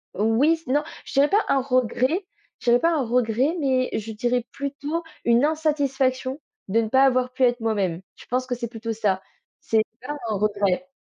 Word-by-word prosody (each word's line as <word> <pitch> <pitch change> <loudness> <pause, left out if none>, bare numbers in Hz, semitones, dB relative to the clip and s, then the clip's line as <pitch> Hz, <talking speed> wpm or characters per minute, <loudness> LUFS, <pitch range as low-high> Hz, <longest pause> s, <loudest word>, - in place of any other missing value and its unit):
Oui. 245 - +2
Non, 290 +3 +2 0.2
je - - -9
dirais 280 +1 +4
pas 415 +1 +3
un 270 - +3
regret. 255 - +1 0.3
J'avais 240 0 +3
pas 335 - +2
un 275 - 0
regret, 245 +5 +1
mais 260 -3 +1
je 220 +1 -3
dirais 240 +2 -1
plutôt 285 +4 -4 0.2
une 235 +4 +4
insatisfaction, 280 -3 0 0.3
de 225 +4 +3
ne 220 - -3
pas 265 +3 +5
avoir 255 -1 +2
pu 260 0 0
être 245 0 +3
moi-même. 195 -6 -1
Je - - -15
pense 255 +1 -1
que 250 - -1
c'est 235 0 -4
plutôt 225 0 -5
ça. 195 -3 0 0.4
C'est 220 -1 +1 0.2
pas 295 +3 -5
un 215 - 0
regret. 205 +4 0
255 Hz, 185 wpm, -24 LUFS, 225-280 Hz, 0.4 s, pas